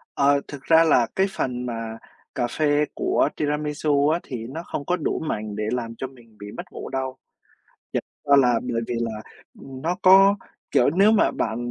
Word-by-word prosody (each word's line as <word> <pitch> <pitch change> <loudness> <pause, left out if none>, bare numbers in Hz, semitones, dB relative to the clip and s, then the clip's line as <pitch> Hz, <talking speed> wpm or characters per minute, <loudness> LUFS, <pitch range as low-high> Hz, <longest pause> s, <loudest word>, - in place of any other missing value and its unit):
Ờ, 140 0 +3
thực 140 -2 -9
ra 160 +2 +6
là 125 -8 +4
cái 190 +1 +3
phần 125 -7 -3
mà 115 -2 -5 0.4
cà 120 -2 0
phê 150 +3 +1
của - - +1
tiramisu 150 -1 0
á 165 - +1
thì 115 -4 -6
nó 160 +7 -6
không 145 - -5
có 180 - +1
đủ 165 - -2
mạnh 105 -9 -4
để 105 - -3
làm 115 -2 -3
cho 130 - -4
mình 115 -4 -19
bị 105 0 -9
mất - - -4
ngủ - - -7
đâu. 130 0 -3 0.8
Thiệt - - -1 0.3
ra 140 - +8
là 125 -4 +4
bởi 120 -2 -2
vì 120 - -2
là, 110 -2 -3 0.4
ừm, 135 -1 -10
nó 175 +4 -1
có 195 +2 +7 0.4
kiểu, 125 - +4
nếu 195 +7 +4
mà 220 -1 +3
bạn 110 0 -2
135 Hz, 200 wpm, -23 LUFS, 120-155 Hz, 0.8 s, ra